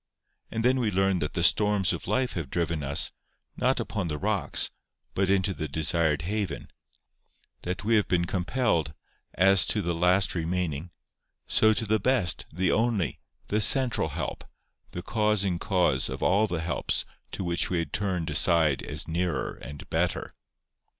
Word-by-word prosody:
And 115 +1 -2
then 130 +1 +3
we 115 -4 +1
learn 95 -1 +1
that 75 -2 -3
the 85 - 0
storms 105 0 +3
of 85 - -6
life 125 +6 0
have 80 -6 -4
driven 85 -1 -1
us, 70 0 0 0.4
not - - +1
upon 100 -5 -3
the 75 -2 -3
rocks, - - 0 0.4
but 95 0 0
into 100 0 +2
the 75 - -4
desired 80 +1 +1
haven; 100 -4 -3 0.9
that 90 +2 -4
we 115 +1 +3
have 105 - +1
been 85 -1 +1
compelled, 90 - 0 0.4
as 95 +1 +5
to 110 - +1
the 85 -3 -1
last 90 +3 +2
remaining, 85 -2 -2 0.6
so 110 - +4
to 110 - 0
the 110 +1 +1
best, 95 - 0
the 90 +3 0
only, 110 - 0 0.3
the 105 +1 +1
central 120 - +3
help, 75 -1 -4 0.5
the 90 - -6
causing 105 -4 0
cause 90 -10 +1
of - - -5
all 105 +3 +3
the 85 -5 -3
helps 85 +1 -1 0.3
to - - -3
which 85 -1 0
we 90 - 0
had 85 -4 -3
turned 95 -5 -1
aside 80 -3 +3
as - - -4
nearer 85 +2 -1
and 70 +4 -9
better. - - -1
90 Hz, 165 wpm, -27 LUFS, 85-105 Hz, 0.9 s, as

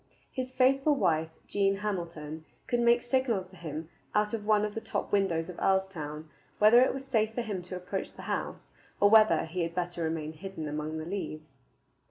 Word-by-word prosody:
His 255 -1 -4
faithful 270 +3 +3
wife, 160 - +1 0.2
Jean 195 -1 +2
Hamilton, 170 -6 -4 0.2
could 240 - 0
make 235 0 +4
signals 240 -6 +1
to 185 - -16
him 160 -2 -6 0.3
out 210 +1 +2
of 210 -2 -3
one 210 -1 +4
of 210 - -4
the 225 - -4
top - - -3
windows 180 -5 +1
of 180 - -8
Earlstoun 165 -6 -1 0.3
whether 215 +4 +7
it 260 - +4
was 270 0 -6
safe 220 -4 +1
for 240 - -1
him 205 -5 -3
to 180 +1 -7
approach 180 +2 -4
the - - -11
house, - - -4 0.3
or 205 0 +5
whether 220 -5 +6
he 170 +3 -3
had 170 0 -2
better 175 -1 -2
remain 160 -1 -2
hidden 165 -1 -6
among 150 +1 -3
the 155 - -5
leaves. 155 -5 -5
190 Hz, 195 wpm, -30 LUFS, 160-220 Hz, 0.3 s, whether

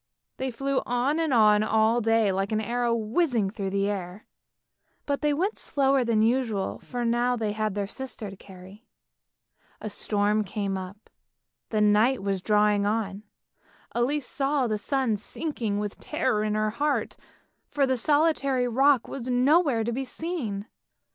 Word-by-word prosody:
They 265 0 -2
flew 275 +3 -1
on 250 +6 0
and 320 -3 0
on 210 -3 +5
all 220 +2 +2
day 225 -2 +3
like 195 +2 -2
an 215 - +1
arrow 235 +2 0
whizzing 230 - 0
through 200 -3 -4
the 200 +1 0
air, 195 0 -5 0.8
but 280 -1 -1
they 300 -1 +2
went 370 +9 -1
slower 275 -2 +2
than 225 -2 +2
usual, 225 -4 0
for 245 -1 -4
now 240 +1 +1
they 220 -3 -2
had 215 -1 -2
their 205 -1 -1
sister 225 -2 -6
to - - -10
carry. 190 +4 -14 0.9
A 215 - -6
storm 210 +1 0
came 200 -1 -3
up, 190 +3 -8 0.6
and 210 -1 +3
night 225 +2 +2
was 195 -2 -1
drawing 210 0 +3
on; 205 -1 -1 0.7
Elise 260 +4 0
saw 275 0 0
the 215 -3 -1
sun 260 -2 0
sinking 230 -2 -4
with 205 -1 -4
terror 260 -8 -1
in 215 0 -1
her 215 0 0
heart, 290 +6 -1 0.5
for 285 -2 +1
the 260 -1 +1
solitary 275 -2 +2
rock 265 +1 +3
was 255 -2 -6
nowhere 260 0 +3
to 235 - -2
be 265 +3 -2
seen. 255 - -4
230 Hz, 160 wpm, -26 LUFS, 210-265 Hz, 0.9 s, on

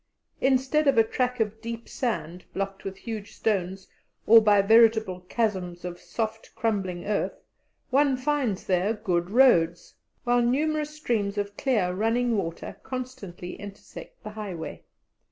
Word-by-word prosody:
Instead 270 +3 +2
of 275 -3 +4
a 225 - +7
track 250 +2 -1
of 220 0 -1
deep 230 0 -6
sand 185 - -3
blocked 195 0 -3
with 195 0 -6
huge 220 -1 -7
stones 190 -3 -1 0.4
or 225 +1 +8
by 210 -2 +5
veritable 220 -2 +5
chasms 185 -6 -1
of 175 0 -6
soft, 225 -1 -4
crumbling 195 -6 -1
earth, 205 0 -2 0.5
one 275 0 +3
finds 255 -7 0
there 185 +3 +1
good 180 -5 -1
roads, 185 -9 +4 0.3
while 245 0 +3
numerous 300 +5 +1
streams 230 -9 -2
of 205 0 -2
clear 210 -10 +1
running 230 +4 +1
water 165 -5 -4
constantly 250 -9 -6
intersect 205 0 -11
the 215 - -6
highway. 195 -7 -6
220 Hz, 135 wpm, -26 LUFS, 190-245 Hz, 0.5 s, or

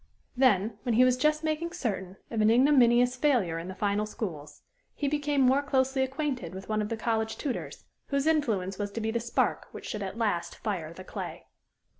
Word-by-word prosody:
Then, 220 -4 +3
when 240 -1 0
he 250 - +6
was 255 -1 +4
just 305 +4 +1
making 315 +2 -1
certain 195 - -3
of 225 -2 0
an 215 - +5
ignominious 245 -1 +5
failure 245 - +1
in 170 - -7
the 190 - -6
final 205 +1 0
schools, 155 -10 -6 0.3
he 290 - -1
became 290 -1 +1
more 265 +2 +4
closely 265 -2 +1
acquainted 265 - -2
with 190 - -8
one 215 0 0
of 210 - -3
the 230 - -2
college 220 -1 -1
tutors, 275 -5 -5 0.2
whose 280 0 0
influence 220 -12 +1
was 205 0 -2
to - - -3
be 220 0 -1
the 235 - 0
spark 235 0 0
which - - -9
should 210 - -4
at 195 +2 -5
last 205 -7 -1
fire 180 -8 -3
the 185 +3 -10
clay. - - -7
230 Hz, 200 wpm, -28 LUFS, 200-270 Hz, 0.3 s, he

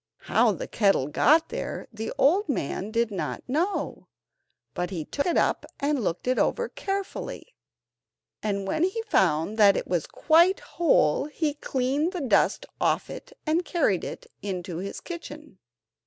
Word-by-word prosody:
How - - +3
the - - -4
kettle 195 -11 +2
got 315 - +4
there - - -4
the 220 0 -4
old 350 +7 +3
man 200 - -2
did 230 0 0
not 195 - -4
know, 330 +10 -1 0.7
but 180 0 -2
he 170 -5 -4
took 285 - -2
it 345 - +2
up - - +2 0.2
and 285 -3 0
looked 175 +4 -2
it 255 - +2
over 480 0 +1
carefully, 395 +5 -5 0.9
and 200 -2 -2
when 310 - -1
he 390 +5 0
found 185 - +1
that 200 -2 +6
it - - -2
was 175 -4 -1
quite 340 +4 +4
whole 275 - +2
he 300 0 -2
cleaned 280 +4 -1
the 360 - -3
dust 265 - +2 0.2
off - - +1
it - - -9
and 325 +3 +1
carried 285 - +1
it - - -6 0.2
into 185 -3 -4
his 195 +3 -5
kitchen. 305 - -9
265 Hz, 155 wpm, -26 LUFS, -, 0.9 s, that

